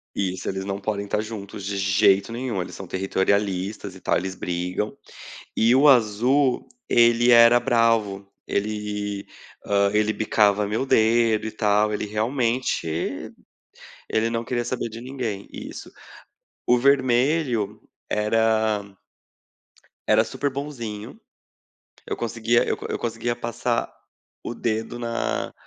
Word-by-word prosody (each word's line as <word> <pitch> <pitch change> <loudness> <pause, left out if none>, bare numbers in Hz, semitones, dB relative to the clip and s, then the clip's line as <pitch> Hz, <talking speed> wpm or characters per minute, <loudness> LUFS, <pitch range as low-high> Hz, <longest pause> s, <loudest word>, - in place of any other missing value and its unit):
Isso, 95 -2 -2
eles 95 0 -2
não 100 0 -4
podem 100 0 -3
estar 105 +1 -1
juntos 105 -3 -7
de 100 0 -3
jeito 95 +1 +3
nenhum, 115 -5 -3
eles 90 - -7
são 95 - -8
territorialistas 95 +1 -1
e 95 - -12
tal, - - 0
eles 95 +1 -4
brigam. 90 +4 -3 0.6
E 115 +3 +4
o 145 +3 +5
azul, 125 +3 +3 0.2
ele 120 +1 +5
era 120 0 +8
bravo, 115 -5 +1 0.2
ele, 105 -1 -3 0.4
hã, 100 0 +2
ele 105 0 +2
bicava 105 -1 +2
meu 110 +6 -1
dedo 110 -2 +3
e - - -4
tal. 105 0 +2
Ele, 105 - -2
realmente 110 - -1 0.8
ele 110 +1 +1
não 115 0 -2
queria 120 0 -2
saber 125 -1 -3
de 115 +1 -9
ninguém. 120 -6 -5
Isso. - - -8 0.8
O 125 - +5
vermelho 130 -2 +2 0.3
era 110 0 +1 1.2
era 110 +1 +5
super 140 +5 -2
bonzinho. 120 -7 -6 0.9
Eu - - -2
conseguia, 115 0 +1
eu - - 0
eu - - -2
conseguia 120 +1 -2
passar 120 0 -2 0.5
o - - -4
dedo 115 +1 -3
na 60 - -2
110 Hz, 125 wpm, -24 LUFS, 100-120 Hz, 1.2 s, era